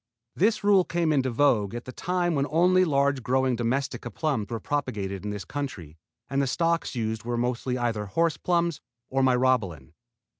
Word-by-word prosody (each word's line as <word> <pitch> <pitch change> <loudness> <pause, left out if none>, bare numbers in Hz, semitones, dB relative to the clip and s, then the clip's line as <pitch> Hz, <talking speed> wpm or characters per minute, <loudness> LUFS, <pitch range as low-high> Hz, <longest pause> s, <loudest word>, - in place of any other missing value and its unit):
This 215 +3 +2
rule 200 -2 +5
came 170 -3 0
into 135 -3 +1
vogue 115 -5 +2
at 120 - -6
the 130 - -7
time 180 +3 -1
when 140 -1 0
only 180 +4 +4
large 140 -3 +1
growing 130 +1 +1
Domestica 120 +1 -2
plums 135 -8 -2
were 115 - -3
propagated 100 -9 -3
in 105 - -3
this 105 -3 -5
country 95 - -6 0.3
and 140 +1 0
the 135 - 0
stocks 165 +1 0
used 110 -1 -2
were 120 0 -2
mostly 125 +1 -1
either 115 -4 -1
"horse 165 +9 +1
plums" 170 -3 0 0.3
or 135 0 +1
Myrobalan. 125 - +1
130 Hz, 175 wpm, -26 LUFS, 115-155 Hz, 0.3 s, rule